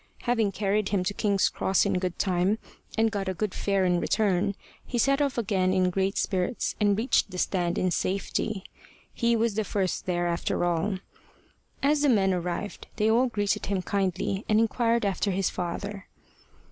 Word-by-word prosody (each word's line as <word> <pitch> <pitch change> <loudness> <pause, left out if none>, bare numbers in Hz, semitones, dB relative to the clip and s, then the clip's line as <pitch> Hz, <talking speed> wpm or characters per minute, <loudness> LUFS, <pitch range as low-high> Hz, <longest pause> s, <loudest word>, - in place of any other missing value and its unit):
Having 225 -5 +1
carried 200 +1 0
him 195 -3 +1
to 185 - -1
King's 200 -2 +2
Cross 190 - +1
in 180 - +1
good 180 -2 -3
time, 185 +2 +1 0.4
and 225 0 +3
got 195 -2 -2
a 190 - -2
good 210 +2 -2
fare 195 -2 +1
in 180 -1 +2
return, 200 0 +1 0.3
he 245 - -4
set 275 +4 +3
off 280 -3 0
again 190 -4 +1
in 185 -1 +2
great 195 +2 0
spirits, 190 +5 -1
and 205 -2 +3
reached 225 -1 +2
the 185 - -7
stand 175 -2 0
in 185 - +1
safety. 195 +2 -1 0.5
He 235 -1 +2
was 230 -1 +1
the 220 +1 0
first 195 -3 -2
there 175 -1 0
after 170 0 0
all. 175 +3 0 0.9
As 290 +1 +3
the 290 - +4
men 195 -5 +3
arrived 180 +3 -4
they 215 0 +2
all 245 +3 +4
greeted 205 -4 -1
him 195 -2 -1
kindly, 195 +1 -1
and 215 0 +4
inquired 230 0 +2
after 200 +1 0
his 190 -1 0
father. 195 +3 -4
200 Hz, 180 wpm, -27 LUFS, 185-220 Hz, 0.9 s, the